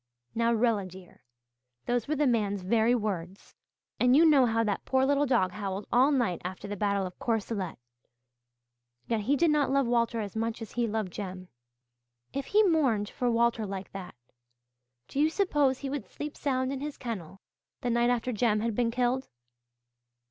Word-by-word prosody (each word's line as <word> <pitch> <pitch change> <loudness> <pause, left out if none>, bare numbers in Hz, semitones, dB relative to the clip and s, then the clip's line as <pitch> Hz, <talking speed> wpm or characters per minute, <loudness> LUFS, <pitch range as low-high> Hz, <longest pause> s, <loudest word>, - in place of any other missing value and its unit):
Now 230 0 +2
Rilla 225 -4 +1
dear, 185 0 -14 0.6
those 240 -2 0
were 305 - 0
the 295 0 +2
man's 205 -6 +1
very 225 +5 +3
words. 195 -4 -4 0.5
And 250 +1 +5
you 325 +3 +7
know 280 -5 +6
how 225 0 +1
that 210 -2 -1
poor 265 0 +2
little 285 +1 +2
dog 230 -8 +2
howled 195 0 -4
all 260 +4 +5
night 240 - 0
after 185 +3 -6
the 205 - -4
battle 200 -1 0
of 180 - -9
Courcelette. 215 -5 -2 1.3
Yet 230 - 0
he 245 +8 +1
did 330 +2 +3
not 295 -3 +2
love 275 0 +2
Walter 235 -1 +1
as 205 -2 -5
much 225 +1 -2
as 225 - -8
he 240 -1 0
loved 215 -4 -3
Jem. 185 -2 -6 0.8
If 275 0 -3
he 425 +1 +4
mourned 265 - +2
for 245 - -1
Walter 235 -1 +2
like 195 0 -6
that, 190 -2 -8 0.9
do 275 - -4
you 305 +2 +4
suppose 295 -8 +1
he 275 - -5
would 285 -1 -4
sleep 295 0 -7
sound 260 -2 -1
in 270 - -4
his 295 +1 -5
kennel 195 -7 -6 0.4
the 245 - -1
night 235 +1 +2
after 245 0 0
Jem 215 -2 +1
had 230 0 -1
been 235 +2 +1
killed? 250 +2 0
235 Hz, 180 wpm, -29 LUFS, 205-265 Hz, 1.3 s, you